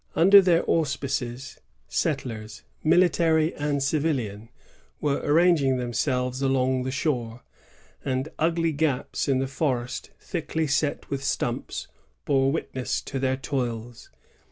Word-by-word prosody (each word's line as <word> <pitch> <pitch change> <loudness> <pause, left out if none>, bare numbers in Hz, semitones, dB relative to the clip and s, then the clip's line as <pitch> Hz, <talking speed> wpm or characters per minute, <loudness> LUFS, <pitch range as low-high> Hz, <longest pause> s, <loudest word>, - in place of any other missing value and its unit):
2 - - +1
Under 195 +3 +9
their 175 -3 +2
auspices, 140 -4 -1 0.3
settlers, 110 - -3 0.2
military 165 -1 +3
and 145 -1 -1
civilian, 135 -8 -1 0.5
were 145 0 0
ranging 155 -5 +4
themselves 125 +1 -1
along 130 -1 +1
the 130 - -3
shore, 125 -5 -2 0.6
and 130 +2 -1
ugly 165 +1 +2
gaps 145 -3 -1
in 135 -2 +2
the 135 - 0
forest 130 -3 -2
thickly 160 -2 -2
set 145 0 0
with 135 -1 -2
stumps - - -2 0.4
bore 135 -1 +3
witness 130 -4 -2
to 135 - -5
their 130 0 0
toils. 120 -4 -4
135 Hz, 120 wpm, -25 LUFS, 125-155 Hz, 0.6 s, Under